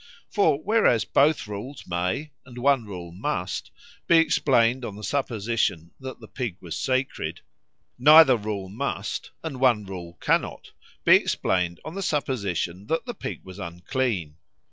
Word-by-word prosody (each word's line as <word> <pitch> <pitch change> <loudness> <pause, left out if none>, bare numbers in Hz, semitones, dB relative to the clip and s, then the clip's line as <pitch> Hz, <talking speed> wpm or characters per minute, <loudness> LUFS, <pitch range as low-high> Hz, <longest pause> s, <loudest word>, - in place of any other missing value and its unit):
For 160 -9 +3
whereas 195 - +3
both 145 -4 +3
rules 105 +7 -7
may, 90 - -2
and 125 -1 -13
one 135 -1 +2
rule 90 -4 -8
must, 95 - -3 0.4
be 170 - +6
explained 130 -6 +3
on 105 -4 -5
the 105 - -10
supposition 110 - -1
that 130 0 -8
the - - -12
pig 120 -9 -4
was 85 -4 -6
sacred; 130 0 -2 0.6
neither 150 0 +8
rule 105 -3 -4
must, 105 0 -4
and 150 -6 -5
one 120 -6 +3
rule 90 -3 -8
cannot, - - -1 0.3
be - - +8
explained 90 -2 -1
on 155 - -6
the 195 - -4
supposition 100 - -2
that 165 - -1
the 240 - -4
pig - - -6
was 95 +1 -11
unclean. 90 - -3
115 Hz, 145 wpm, -25 LUFS, 95-140 Hz, 0.6 s, neither